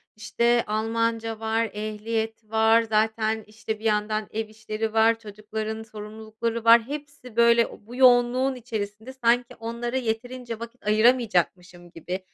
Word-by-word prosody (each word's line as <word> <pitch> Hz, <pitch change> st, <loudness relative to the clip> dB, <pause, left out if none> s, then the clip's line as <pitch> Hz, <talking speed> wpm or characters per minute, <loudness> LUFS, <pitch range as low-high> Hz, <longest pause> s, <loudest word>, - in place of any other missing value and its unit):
işte, 235 Hz, +3 st, +1 dB
Almanca 225 Hz, +1 st, -1 dB
var, 225 Hz, 0 st, 0 dB
ehliyet 220 Hz, +1 st, -3 dB
var, 220 Hz, +1 st, +4 dB
zaten, 220 Hz, 0 st, 0 dB
işte, 215 Hz, 0 st, -5 dB
bir -, -, -15 dB
yandan 215 Hz, 0 st, 0 dB
ev 220 Hz, 0 st, -3 dB
işleri 220 Hz, 0 st, -4 dB
var, 225 Hz, +1 st, +4 dB
çocukların 215 Hz, +1 st, -6 dB
sorumlulukları 220 Hz, +1 st, -5 dB
var, 230 Hz, 0 st, +8 dB
hepsi, 290 Hz, -5 st, -8 dB
böyle, 235 Hz, -2 st, +3 dB
bu 245 Hz, -, -9 dB
yoğunluğun 255 Hz, +1 st, +4 dB
içerisinde 220 Hz, 0 st, -6 dB
sanki 245 Hz, -1 st, +1 dB
onlara 235 Hz, +2 st, -3 dB
yeterince 240 Hz, 0 st, -4 dB
vakit 235 Hz, -1 st, -10 dB
ayıramayacakmışım 190 Hz, -6 st, +1 dB
gibi 180 Hz, +3 st, -5 dB
225 Hz, 125 wpm, -25 LUFS, 215-235 Hz, -, var